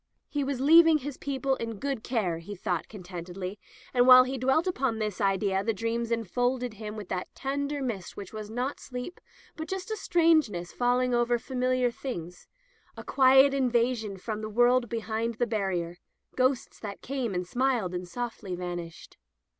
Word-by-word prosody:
He 290 -2 -2
was 270 -2 -2
leaving 325 +3 +7
his 290 -1 -6
peo 280 -1 -3
ple 270 -1 +1
in 230 -2 -4
good 275 -1 -3
care, 190 -10 -1
he 205 +5 -8
thought 180 -3 -2
contentedly, 185 0 -7 0.3
and 245 0 +4
while 255 0 +10
he 260 +1 -4
dwelt 265 +6 +2
upon 265 -10 0
this 215 -2 -3
idea 195 0 +1
the 225 0 0
dreams 230 +2 -2
enfolded 245 +2 0
him 215 0 -7
with 210 -3 -7
that 185 -1 -3
tender 280 +1 -2
mist 210 -8 -4
which 200 0 -8
was 215 -1 -6
not 250 +5 -3
sleep, 250 +7 -7 0.3
but 315 0 -6
just 380 +2 -4
a - - 0
strangeness 315 - +2
falling 250 0 +1
over 240 0 +2
familiar 255 0 0
things 180 -9 -7 0.2
— 450 -2 -35
a - - -7
quiet 265 +1 +5
invasion 240 -5 +1
from 215 +3 -5
the 215 - -4
world 240 +2 +3
behind 230 0 -2
the 240 - +1
barrier 190 -6 -2 0.2
— - - -36
ghosts 255 0 0
that 205 -2 -7
came 255 -7 -2
and 180 0 -1
smiled 240 -5 0
and 180 0 -4
softly 230 -3 -5
vanished. 175 -2 -7
235 Hz, 180 wpm, -28 LUFS, 200-265 Hz, 0.3 s, while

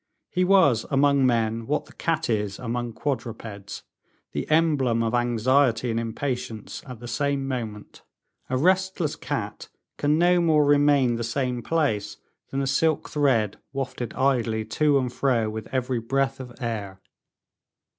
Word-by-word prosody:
He 180 - +1
was 180 - +4
among 140 -1 +3
men 115 -1 0
what 150 +2 0
the - - -17
cat 165 -1 -1
is 105 -4 -1
among 120 -1 -3
quadrupeds, 110 -6 -5 0.5
the - - -4
emblem 145 -8 +2
of 115 0 -1
anxiety 120 0 +2
and 115 - 0
impatience, 115 -1 -4
at 125 -3 -8
the 120 - -8
same 140 +2 -1
moment. 110 -6 -5 0.5
A 130 - 0
restless 185 +1 +1
cat - - -5 0.3
can 150 +1 +2
no 175 +1 +4
more 155 -3 +4
remain 145 -4 +4
the 120 - -3
same 125 +1 -1
place 110 -9 -1 0.3
than 135 - -2
a - - 0
silk 155 +4 +1
thread 130 -9 +1
wafted 130 -4 -4
idly 120 -5 +1
to 145 +6 +2
and 125 -2 -1
fro 120 -5 +1
with 110 0 -6
every 130 -2 -1
breath 135 +3 -1
of 125 -2 -8
air. 105 -6 -4
130 Hz, 145 wpm, -25 LUFS, 115-145 Hz, 0.5 s, was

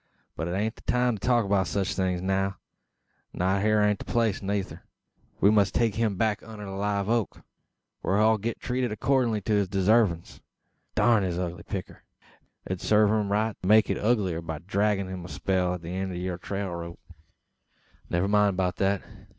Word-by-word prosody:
But 80 - -3
'taint 100 +6 -2
the - - -15
time 125 -3 +1
to 95 - -5
talk 120 -3 +3
o' 100 -1 +3
sech 95 +2 -1
things 95 -1 -1
now; 95 +1 0 0.8
not 95 +2 +1
hyur 110 0 +3
ain't 105 -1 +2
the - - -8
place 115 -4 +1
neythur. 100 -1 -3 0.6
We 100 - +5
must 100 -3 +3
take 115 -3 +2
him 110 -2 0
back 105 -1 0
unner 110 -2 -9
the 95 - -7
live 100 0 -1
oak, 115 -1 -1 0.6
whar 95 - +1
he'll 110 +1 +4
git 115 +3 -3
treated 125 -2 -1
accordin' 120 0 +1
to 110 - 0
his 100 -2 +2
desarvins. 95 -2 +1 0.5
Durn 115 -3 +4
his 90 -3 -2
ugly 90 -1 -3
picter! 95 +1 -6 0.6
It - - -10
would 95 - -3
sarve 105 -1 +4
him 105 -2 0
right 110 +1 +1
to 90 - -4
make 110 +1 +5
it - - -1
uglier 100 -7 +1
by 80 -1 -5
draggin' 100 +3 0
him 95 -1 -6
a 90 - -9
spell 90 -2 0
at 90 - -10
the 85 - -6
eend 95 +1 -3
o' - - -5
yur 90 0 -3
trail 100 0 -4
rope. 85 0 -7 1.1
"Never 90 +3 +1
mind 105 -2 +3
beout 90 -1 0
that. 100 -1 +1
100 Hz, 190 wpm, -27 LUFS, 95-110 Hz, 1.1 s, We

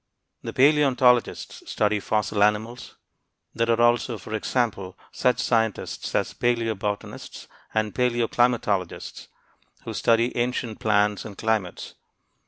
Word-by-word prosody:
The - - -5
paleontologists 130 -4 +2
study 105 -1 +1
fossil 105 0 -1
animals. 110 +4 0 0.6
There 115 0 0
are 115 0 +2
also, 120 0 +2
for 110 +2 -9
example, 110 -4 -2
such 125 - +1
scientists 115 -3 -1
as - - 0
paleobotanists 110 -4 -3 0.3
and 110 -1 0
paleoclimatologists, 120 -5 0 0.6
who - - -6
study 115 +1 +2
ancient 120 -2 -2
plants 105 -1 +1
and 105 -3 -10
climates. 110 -5 -2
115 Hz, 105 wpm, -24 LUFS, 105-120 Hz, 0.6 s, paleontologists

